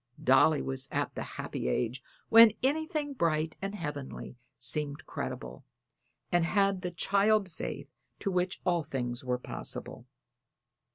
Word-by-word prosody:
Dolly 140 +3 +5
was 135 0 -2
at - - -1
the - - -5
happy - - -4
age 120 - -1 0.3
when 225 -1 +9
anything 305 +1 0
bright 160 - 0
and 195 +1 -3
heavenly 145 -8 -6 0.2
seemed 145 +4 -2
credible, 60 0 -6 0.7
and 175 -1 +4
had 195 +1 +2
the 180 - -2
child 200 +2 +2
faith - - -6 0.2
to 195 - -2
which 180 0 -1
all 175 -2 +2
things 125 -4 -4
were 125 -1 0
possible. 125 - -5
165 Hz, 130 wpm, -30 LUFS, 135-200 Hz, 0.7 s, when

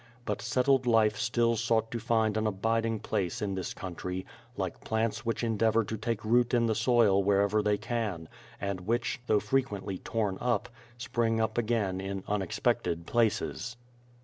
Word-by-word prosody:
But 105 -2 -2
settled 130 +3 +2
life 110 -2 +4
still 115 +2 +1
sought 115 0 +1
to 120 - -2
find 110 -2 +1
an 110 0 +1
abiding 115 +2 0
place 90 -4 -2
in 100 -2 -2
this 95 -1 -3
country, 90 0 -5 0.3
like - - -4
plants 110 0 -1
which 115 - -1
endeavor 115 0 +2
to 110 - -4
take 110 0 -3
root 120 +2 +3
in 120 -1 +3
the 115 - +2
soil 110 -4 +3
wherever 100 +2 +3
they 105 0 +1
can, 105 -9 -3 0.3
and 100 -2 -3
which, 120 +3 0
though 105 - +4
frequently 105 -5 -1
torn 105 -4 -2
up, 120 -4 0 0.3
spring 115 -1 0
up 110 0 0
again 110 -5 0
in 95 0 -4
unexpected 90 -3 0
places. 115 +1 0
110 Hz, 160 wpm, -30 LUFS, 100-115 Hz, 0.3 s, life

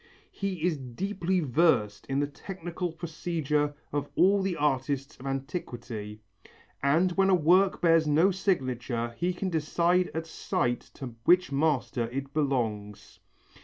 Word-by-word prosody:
He 190 -5 -4
is 175 -3 +1
deeply 180 - -2
versed 125 -8 +2
in 135 0 0
the - - +2
technical 175 +3 -5
procedure 155 -3 -2 0.2
of 145 0 -2
all 195 +2 +4
the 190 -3 -1
artists 140 -1 -1
of 135 - -7
antiquity, 120 - -5 0.6
and 160 +7 +3
when 195 +2 +2
a 190 - +6
work 180 +4 +3
bears 165 -2 +4
no 160 +6 +4
signature 125 - -1
he 175 +6 0
can 185 +1 -3
decide 170 +3 +2
at 160 0 -2
sight 120 -6 -1 0.2
to 130 -4 -7
which 180 -3 +4
master 130 -5 0
it 135 +2 -5
belongs. 115 -9 -2
150 Hz, 135 wpm, -28 LUFS, 130-175 Hz, 0.6 s, a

